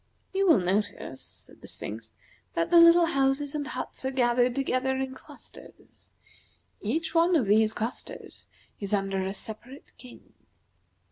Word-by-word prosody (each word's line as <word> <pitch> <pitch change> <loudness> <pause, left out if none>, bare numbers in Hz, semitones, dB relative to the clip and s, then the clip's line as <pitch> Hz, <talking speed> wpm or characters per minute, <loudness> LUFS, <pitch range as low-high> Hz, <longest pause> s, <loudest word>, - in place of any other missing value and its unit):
"You 390 0 +2
will 330 - +7
notice," 195 +3 -2
said - - -10
the - - -11
Sphinx, - - -7 0.4
"that 335 0 0
the 345 - +8
little 335 +1 +8
houses 275 -2 0
and 295 -1 -3
huts 255 -2 -6
are 260 - 0
gathered 245 -1 +2
together 265 -1 0
in 265 0 -3
clusters. - - -15 0.7
Each 315 +12 -2
one 340 +1 +4
of 275 -8 +3
these 215 +2 +4
clusters 225 +3 -6 0.3
is 200 0 0
under 195 -1 -1
a 190 - -2
separate 230 +7 -8
king." 250 -1 -14
260 Hz, 145 wpm, -27 LUFS, 220-305 Hz, 0.7 s, the